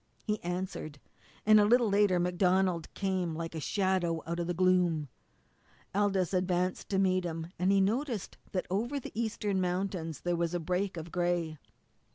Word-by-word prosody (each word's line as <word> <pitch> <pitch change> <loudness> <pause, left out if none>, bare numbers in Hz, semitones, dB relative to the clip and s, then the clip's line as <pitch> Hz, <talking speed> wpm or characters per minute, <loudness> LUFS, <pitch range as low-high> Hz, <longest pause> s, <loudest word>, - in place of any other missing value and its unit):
He 210 -2 -1
answered, 175 -4 -4 0.5
and 215 0 +7
a 205 - +5
little 240 +2 +4
later 200 -2 +3
MacDonald 180 -1 +1
came 185 -4 -1
like 165 0 -4
a 160 - -4
shadow 185 -2 0
out 170 +1 -3
of 170 - -2
the 175 - 0
gloom. 175 -5 +2 0.8
Aldous 195 -2 +1
advanced 180 0 0
to 195 - 0
meet 185 -1 +2
him, 165 0 -4
and 185 +2 +3
he 195 0 +4
noticed 230 +2 -1 0.2
that 185 - -1
over 240 +9 0
the - - -8
eastern 210 -3 -1
mountains 180 -4 -2
there 175 0 0
was 170 0 -1
a - - 0
break 180 +3 -1
of 165 +1 -7
gray. 175 -3 -1
185 Hz, 170 wpm, -31 LUFS, 170-195 Hz, 0.8 s, and